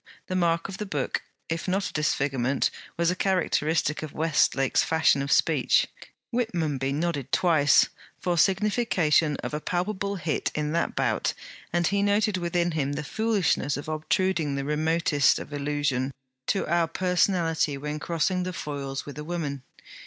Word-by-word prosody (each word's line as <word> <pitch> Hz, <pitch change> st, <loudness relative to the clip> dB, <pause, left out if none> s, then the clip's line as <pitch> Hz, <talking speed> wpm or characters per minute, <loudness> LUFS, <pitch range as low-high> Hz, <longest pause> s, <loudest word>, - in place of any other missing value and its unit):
The 185 Hz, -, -4 dB
mark 170 Hz, -2 st, +1 dB
of 195 Hz, 0 st, -8 dB
the 210 Hz, -, -4 dB
book, 145 Hz, -7 st, -2 dB, 0.3 s
if 165 Hz, +3 st, -3 dB
not 190 Hz, +1 st, 0 dB
a -, -, -14 dB
disfigurement, 140 Hz, -3 st, 0 dB, 0.3 s
was 170 Hz, +1 st, +2 dB
a -, -, -2 dB
characteristic 165 Hz, -5 st, +1 dB
of 155 Hz, -2 st, -6 dB
Westlake's 145 Hz, -4 st, +2 dB
fashion 160 Hz, -3 st, +3 dB
of 140 Hz, 0 st, -3 dB
speech. -, -, +3 dB, 0.5 s
Whitmonby 160 Hz, -, -1 dB
nodded 150 Hz, -2 st, -2 dB
twice, 155 Hz, -6 st, +4 dB, 0.3 s
for 175 Hz, -1 st, 0 dB
signification 185 Hz, -5 st, +2 dB
of -, -, -4 dB
a 150 Hz, -, -2 dB
palpable 200 Hz, +3 st, -2 dB
hit 165 Hz, -4 st, -1 dB
in 150 Hz, 0 st, -1 dB
that 170 Hz, +1 st, -1 dB
bout; -, -, 0 dB, 0.4 s
and 175 Hz, 0 st, +1 dB
he 200 Hz, +3 st, +1 dB
noted 205 Hz, 0 st, +2 dB
within 175 Hz, 0 st, 0 dB
him 145 Hz, -3 st, -1 dB
the 150 Hz, +1 st, -3 dB
foolishness 205 Hz, -8 st, 0 dB
of 145 Hz, -, -7 dB
obtruding 155 Hz, 0 st, 0 dB
the 140 Hz, 0 st, -3 dB
remotest 150 Hz, -1 st, +2 dB
allusion 145 Hz, -2 st, -1 dB, 0.4 s
to 195 Hz, -, +1 dB
our 170 Hz, 0 st, +2 dB
personality 170 Hz, -4 st, +1 dB
when 150 Hz, +2 st, -4 dB
crossing 170 Hz, +3 st, 0 dB
the 185 Hz, 0 st, -3 dB
foils 140 Hz, -4 st, -5 dB
with 145 Hz, 0 st, -8 dB
a -, -, -5 dB
woman. 150 Hz, -5 st, -3 dB
160 Hz, 150 wpm, -26 LUFS, 145-180 Hz, 0.5 s, twice